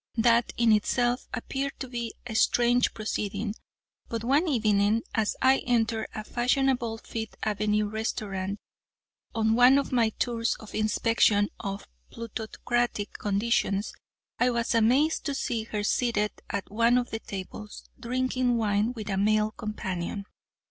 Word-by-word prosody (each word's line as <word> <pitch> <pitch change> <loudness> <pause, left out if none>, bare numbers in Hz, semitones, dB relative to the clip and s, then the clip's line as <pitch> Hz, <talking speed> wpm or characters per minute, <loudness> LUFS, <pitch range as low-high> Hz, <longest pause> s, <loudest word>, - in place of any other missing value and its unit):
That, 235 +1 +4
in 235 -1 +4
itself, 240 +3 +1
appeared 275 0 -3
to 260 - -4
be 235 -2 -5
a 240 - -5
strange 240 +2 +3
proceeding, 210 -1 -3 0.6
but 230 -1 -3
one 280 +8 +2
evening 215 -4 +2
as 220 -2 0
I 265 +1 +5
entered 225 -2 0
a 215 - -4
fashionable 245 -1 +1
Fifth 225 0 -6
avenue 210 0 +1
restaurant 205 -2 -3 0.8
on 220 -1 +2
one 250 +3 +7
of 280 - -1
my 235 -3 +3
tours 230 +1 -1
of 220 - -12
inspection 215 -1 +2
of 195 0 -5 0.2
plutocratic 230 -1 -2
conditions, 205 -1 0 0.5
I 250 - +4
was 235 -1 0
amazed 255 +8 +3
to 285 -2 -1
see 225 -4 -2
her 210 -2 -3
seated 210 -1 +1 0.2
at 200 -1 -4
one 230 +3 +4
of 245 -1 -1
the 225 - -3
tables, 205 +1 -8
drinking 255 0 0
wine 215 +1 +1
with 220 -4 -7
a 195 -2 -1
male 215 +2 +2
companion. 200 -3 -4
225 Hz, 140 wpm, -27 LUFS, 210-245 Hz, 0.8 s, one